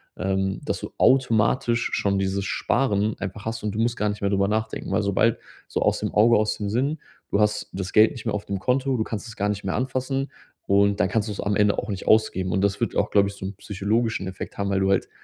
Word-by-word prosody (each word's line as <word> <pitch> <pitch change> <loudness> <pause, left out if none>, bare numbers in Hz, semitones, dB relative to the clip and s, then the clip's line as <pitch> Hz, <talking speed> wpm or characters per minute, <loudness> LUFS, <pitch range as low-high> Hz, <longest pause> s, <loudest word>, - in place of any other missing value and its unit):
ähm, 95 +1 -1
dass - - -2
du - - -7
automatisch 120 -1 +3
schon 100 -1 +1
dieses 95 0 -1
Sparen 105 -2 0
einfach 100 +1 -6
hast 115 0 -4
und 105 -1 -2
du 110 - -2
musst 115 +1 +1
gar 105 0 0
nicht 105 0 -5
mehr 100 - +1
drüber 100 0 +2
nachdenken. 110 +1 -2
Weil 110 - +2
sobald 100 +3 +2 0.3
so, - - -2
aus - - +2
dem - - -2
Auge, 115 +2 +5
aus 105 0 +1
dem 100 -1 -3
Sinn, 140 +7 0 0.3
du 100 - +2
hast 105 0 +1
das 95 0 -5
Geld 110 +5 +6
nicht 125 -6 -9
mehr - - 0
auf 105 - -4
dem 100 -1 -3
Konto, 130 +4 +1
du 110 - 0
kannst 110 0 -5
es 115 - -10
gar 105 +1 -1
nicht 100 -1 -3
mehr 95 - -2
anfassen 130 +2 -2 0.4
und 100 +1 +3
dann 95 - +2
kannst 105 +1 0
du - - -2
es - - -10
am 100 0 0
Ende 105 -1 +3
auch - - -5
nicht 100 -2 -5
ausgeben. 95 -4 +3
Und 95 - +1
das 100 0 +1
wird - - -1
auch, - - +1
glaube 100 -1 +3
ich, - - -8
so - - -10
'n 95 0 -5
psychologischen 105 +1 -1
Effekt 95 0 -7
haben, 100 0 0
weil 95 -1 +1
du 95 0 +2
halt 95 - +1
105 Hz, 260 wpm, -24 LUFS, 100-115 Hz, 0.4 s, Geld